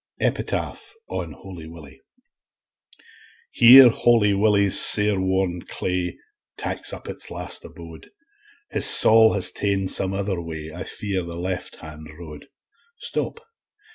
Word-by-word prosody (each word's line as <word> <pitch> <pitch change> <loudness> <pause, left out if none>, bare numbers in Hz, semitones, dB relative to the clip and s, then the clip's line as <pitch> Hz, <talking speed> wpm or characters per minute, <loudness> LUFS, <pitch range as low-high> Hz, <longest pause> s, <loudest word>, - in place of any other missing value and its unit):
Epitaph - - -4 0.2
On - - -7
Holy 90 -5 -13
Willie 80 -5 -14 1.5
Here 125 +2 +7
Holy 115 -3 0
Willie's 100 -1 +3
sair 105 -2 +5
worn 95 -2 -3
clay 90 -1 -5 0.4
Taks - - -2
up - - -10
its - - -8
last - - -3
abode; 85 -1 -14 0.6
His - - +5
saul 110 0 +6
has 95 -3 0
ta'en 100 -2 -3
some 95 0 -2
other 95 -2 -4
way, 80 -1 -9
I 90 - -8
fear, 100 -3 -5
the 85 -1 -10
left 90 +1 -6
hand 80 0 -12
road. 75 -4 -13 0.5
Stop! 460 - -6
95 Hz, 125 wpm, -20 LUFS, 85-100 Hz, 1.5 s, Here